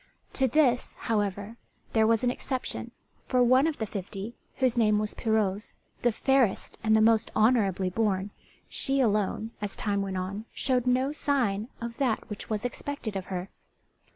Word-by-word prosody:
To 265 - +3
this, 250 -2 +2
however, 205 0 -1 0.4
there 220 -1 +4
was 225 0 +3
an 245 - +3
exception, 255 0 -3 0.4
for 250 -1 +3
one 255 +4 +5
of 320 - -2
the 220 - -2
fifty 200 +2 -6 0.2
whose 255 -2 +2
name 215 -3 +4
was 210 0 -1
Pirouzè, 215 -2 0 0.3
the 240 - +3
fairest 260 -2 +1
and 220 0 +4
the 220 - +5
most 225 0 +4
honourably 200 -5 +3
born, 200 -1 0 0.4
she 275 0 -1
alone, 215 -2 +1
as 205 -1 -3
time 200 -1 -1
went 195 -1 -3
on, 195 +4 -4
showed 255 -2 0
no 255 +3 +2
sign 240 -9 0
of 235 0 -6
that 250 -6 0
which 210 - -6
was 215 +1 -2
expected 245 -4 -4
of 190 -1 -3
her. 185 0 -4
220 Hz, 165 wpm, -28 LUFS, 205-250 Hz, 0.4 s, one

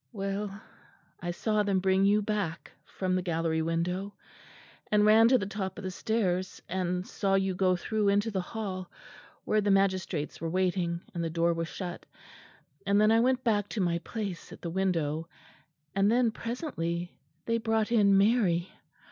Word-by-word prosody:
"Well, 200 -1 -4 0.6
I 175 - -3
saw 215 +4 0
them 200 -2 +1
bring 190 +1 +3
you 205 +1 +3
back, 200 -5 -3
from 185 -1 -2
the 185 - +1
gallery 165 -2 0
window 180 +5 -2 0.8
and 210 0 +4
ran 220 +2 +7
to 255 +2 +5
the 200 - -3
top 190 -1 -4
of 205 - -7
the 185 - -3
stairs 185 -3 -1
and 180 0 -2
saw 195 -1 0
you 190 -1 +1
go 185 0 +2
through 210 +3 -1
into 205 +3 +2
the 190 -2 -1
hall 185 -2 -5 0.6
where 215 - +2
the 205 - 0
magistrates 190 -6 0
were 165 - -2
waiting, 180 -1 0
and 170 -2 -2
the 165 - -1
door 170 +1 +1
was 165 0 -3
shut; 175 0 -7 0.8
and 200 +1 +3
then 215 +1 +5
I 225 - +5
went 255 +2 +2
back 205 -4 +1
to 220 - -4
my 170 -2 +1
place 195 -1 -6
at - - -12
the 170 - -3
window 165 -4 -1 0.6
and 195 +2 +3
then 240 -1 +3
presently 175 - -4 0.3
they 230 0 +1
brought 225 -1 0
in 200 -4 +5
Mary. 195 -5 +2
195 Hz, 175 wpm, -29 LUFS, 175-210 Hz, 0.8 s, ran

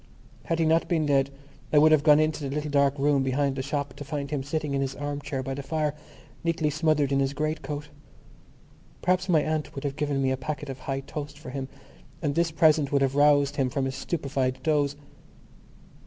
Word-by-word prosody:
Had 165 - 0
he 165 - +2
not 160 +1 +3
been 165 -3 +1
dead 140 -2 +2 0.4
I 150 - +4
would 155 +2 +7
have 155 -2 +5
gone 150 0 +6
into 155 0 +1
the 140 - -4
little 150 0 -2
dark 140 0 +3
room 140 0 +2
behind 135 +1 0
the 135 - -2
shop 140 0 -3
to 145 - -6
find 140 0 -4
him 145 -2 -1
sitting 145 +1 -3
in 135 - 0
his 135 0 -2
arm 145 0 -4
chair 140 -2 -4
by 135 +1 -3
the 140 - -4
fire, 150 +1 -1 0.5
nearly 165 -2 0
smothered 155 -2 +1
in 140 - +2
his 135 0 0
great 155 +1 -1
coat. 150 0 -5 1.1
Perhaps 185 +1 +1
my 160 -4 +4
aunt 155 -1 -2
would 140 - -5
have 140 -1 -2
given 145 -2 0
me 135 -1 +1
a 130 - 0
packet 145 +1 -5
of 130 - -9
High 135 +1 -3
Toast 145 +1 -7
for 150 -4 -9
him 135 -1 -4 0.5
and 145 -4 -1
this 170 +2 +2
present 155 -2 +3
would 140 -1 +3
have 135 -1 +1
roused 145 0 +4
him 135 -2 +1
from 135 +1 -1
his 135 - -2
stupefied 135 -5 -2
doze. 145 -2 +1
145 Hz, 220 wpm, -27 LUFS, 135-155 Hz, 1.1 s, would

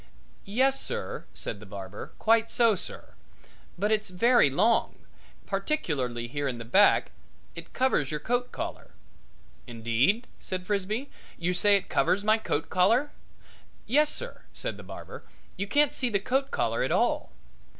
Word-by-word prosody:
"Yes, 265 +5 +2
sir," - - -5
said 100 - -6
the 105 - -11
barber, 95 0 -8
"quite 225 0 +3
so, 230 -2 +4
sir; 195 - -5 0.6
but 205 +4 0
it's 215 -2 +1
very 230 - +4
long, 215 - +2 0.5
particularly 150 - -2
here 145 +3 -3
in 125 -3 -3
the 115 - -7
back 195 - +4 0.4
it - - -10
covers 255 - +1
your 150 - -3
coat 245 +7 -1
collar." - - -6 0.7
"Indeed?" 120 - +1
said 185 -1 -5
Frisbee. 210 +7 -2 0.3
"You 175 +1 0
say 205 +3 +4
it 195 - 0
covers 200 +2 +1
my 215 +1 +3
coat 160 -7 -2
collar?" 230 +11 +3 0.7
"Yes, 300 +5 +3
sir," - - -6
said - - -4
the - - -9
barber. - - -9 0.3
"You 200 +1 -3
can't 290 +6 +3
see 255 - -1
the 205 -3 +1
coat 265 +6 0
collar - - 0
at - - 0
all." - - +1
200 Hz, 150 wpm, -28 LUFS, 145-240 Hz, 0.7 s, so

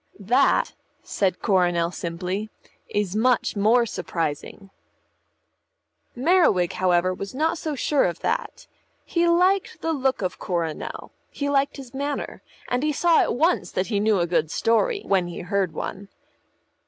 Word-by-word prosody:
"That," 245 +8 +2 0.3
said 190 -3 -1
Coronel 175 -4 +2
simply, 180 +5 -4 0.4
"is 205 -2 -1
much 240 +2 +2
more 225 +4 +4
surprising." 175 0 -4 1.4
Merriwig, 250 - +3
however, 185 0 +2
was 195 +5 -7
not 320 +4 0
so 310 -2 -3
sure 285 +1 +2
of 175 -1 -3
that. - - -3 0.4
He 345 0 +1
liked 365 +3 +2
the 325 - 0
look 265 -6 0
of 180 - -3
Coronel, 170 -4 -4 0.2
he 285 0 -3
liked 280 +1 +1
his 265 -2 -10
manner, 285 +1 -4 0.3
and 245 +1 0
he 305 +1 +1
saw 335 +3 +3
at - - 0
once 330 +7 +1
that 185 - -1
he 200 - +2
knew 210 0 +2
a 170 - +2
good 170 -2 0
story 400 - +1
when 190 -3 +1
he 175 - -6
heard 190 -1 -1
one. 195 +5 -6
210 Hz, 145 wpm, -24 LUFS, 180-285 Hz, 1.4 s, more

